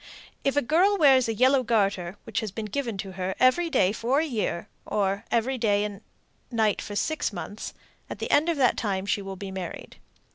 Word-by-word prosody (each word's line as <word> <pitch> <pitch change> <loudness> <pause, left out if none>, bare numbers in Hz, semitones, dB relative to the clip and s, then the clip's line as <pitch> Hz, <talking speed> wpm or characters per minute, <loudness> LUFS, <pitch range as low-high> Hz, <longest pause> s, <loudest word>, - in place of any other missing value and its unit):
If 275 +1 +1
a 290 - +3
girl 365 +10 +3
wears 265 -7 +5
a - - 0
yellow 260 +4 +4
garter 200 -6 0
(which 225 -3 -2
has 220 - -3
been 220 +2 -5
given 230 0 -3
to 190 0 -5
her) 185 0 -3
every 295 +7 +4
day 195 - +3
for 240 +6 +1
a 320 - +1
year, 215 - -2 0.2
or 200 +1 -1
every 245 +3 0
day 205 -3 +2
and 205 -1 -5 0.5
night 220 -4 +1
for 205 - -7
six 315 +6 -1
months, 205 +1 -7 0.3
at - - -5
the - - -4
end 300 +4 +4
of 335 - 0
that 255 -3 +3
time 195 -4 -1
she 205 - 0
will 195 -1 -6
be 195 +1 -7
married. 185 -2 -7
220 Hz, 210 wpm, -26 LUFS, 200-265 Hz, 0.5 s, wears